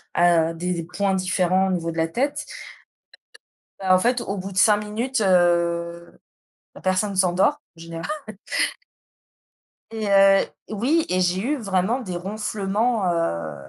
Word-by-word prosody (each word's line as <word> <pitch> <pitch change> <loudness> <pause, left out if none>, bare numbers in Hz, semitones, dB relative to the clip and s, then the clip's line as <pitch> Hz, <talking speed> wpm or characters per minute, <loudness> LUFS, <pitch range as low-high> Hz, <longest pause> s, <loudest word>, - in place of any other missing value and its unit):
à 170 -1 +3
des 175 0 -2
points 195 +3 -1
différents 185 0 +1
au - - -1
niveau 165 -1 -2
de 165 - -9
la 160 0 +1
tête. 285 - -2 1.3
Bah, 190 -1 +3
en - - +5
fait, 240 +4 +1
au 200 0 -4
bout 195 +2 -6
de - - -12
5 205 +2 +5
minutes, 225 +4 -2
heu, 170 -2 +1 0.6
la - - -12
personne 190 +2 0
s'endort 190 +11 +2 0.2
en - - -16
général 165 0 -7 1.9
et 220 -1 -4
heu 195 0 +5 0.2
oui 265 +10 +1
et 185 0 +1
j'ai 180 +1 +1
eu 285 +6 -1
vraiment 200 +2 0
des 185 -8 -6
ronflements, 205 +1 -1
heu, 85 - -2
190 Hz, 145 wpm, -23 LUFS, 175-215 Hz, 1.9 s, en